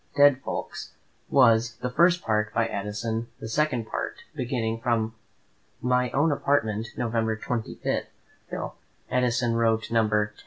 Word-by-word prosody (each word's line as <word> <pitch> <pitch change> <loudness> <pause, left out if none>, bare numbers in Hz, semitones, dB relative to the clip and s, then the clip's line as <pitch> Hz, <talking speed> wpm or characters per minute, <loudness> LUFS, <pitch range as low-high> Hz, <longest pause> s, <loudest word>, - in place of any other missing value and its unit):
"Dead 145 -2 +6
Folks," - - -5 0.4
was, 115 -3 +4
the 125 0 -3
first 170 +5 +4
part, 105 -1 +1
by 115 - +3
Addison; 110 +2 -3
the - - -6
second 125 -1 0
part, - - -4
beginning 115 -3 -2
"From 115 -2 0 0.7
my 125 0 +2
own 145 +6 +2
Apartment, 115 -7 +1
November 115 -2 0
25," 115 0 -4
by - - 0 0.4
Steele; - - -5 0.4
Addison 125 -1 +2
wrote 115 -1 +1
No. 115 -1 +3 0.2
X. 105 0 -8
115 Hz, 140 wpm, -26 LUFS, 110-125 Hz, 0.7 s, Dead